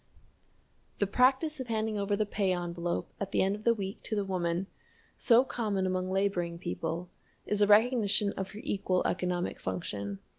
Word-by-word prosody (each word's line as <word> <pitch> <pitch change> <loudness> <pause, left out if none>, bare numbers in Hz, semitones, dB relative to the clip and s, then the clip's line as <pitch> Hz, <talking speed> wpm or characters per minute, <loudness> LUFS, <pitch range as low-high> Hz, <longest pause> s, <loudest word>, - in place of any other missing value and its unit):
The 205 - +2
practice 265 - +2
of 260 - -4
handing 220 -2 -1
over 200 0 0
the 215 +1 +1
pay 200 -2 0
envelope 175 -1 -3
at 200 -1 -3
the - - +3
end 195 +1 +1
of 210 - -11
the 235 - +5
week 195 -2 -5
to 220 - -2
the 205 -1 0
woman, 180 -1 -1 0.5
so 240 +1 +5
common 210 -7 -1
among 185 0 -1
laboring 185 -3 0
people, 170 0 -4 0.3
is 210 0 0
a 205 - +5
recognition 210 -2 +4
of 190 0 -4
her 210 - -9
equal 185 -2 0
economic 180 0 -1
function. 100 +2 -4
195 Hz, 175 wpm, -30 LUFS, 180-215 Hz, 0.5 s, the